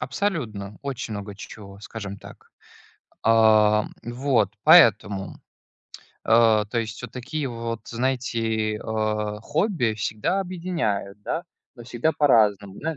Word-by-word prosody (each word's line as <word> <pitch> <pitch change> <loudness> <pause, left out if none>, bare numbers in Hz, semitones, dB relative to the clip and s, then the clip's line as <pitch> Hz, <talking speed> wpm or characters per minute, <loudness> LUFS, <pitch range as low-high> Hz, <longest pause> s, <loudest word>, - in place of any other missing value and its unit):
Абсолютно. 110 - -3
Очень 130 -5 -4
много 100 0 -6
че - - -10
чего, 100 -2 -12
скажем 100 -2 -7
так. - - -15 0.7
А, 110 -1 +5 0.2
м, 120 - -6
вот, 120 -6 +1
поэтому. 110 - +5 0.9
А, 110 -1 +4
то 115 +3 -2
есть 115 +1 -4
вот 125 - -8
такие 135 +3 -4
вот, 115 -1 -5
знаете, 115 -3 -1
а, 105 -1 -2
хобби 145 - 0
всегда 110 - -1
объединяют, 165 - -3
да, 170 - -3 0.3
но 120 -2 -12
всегда 125 +6 -1
по-разному, 105 -8 +2
да. 160 -1 -3
115 Hz, 125 wpm, -24 LUFS, 105-130 Hz, 0.9 s, А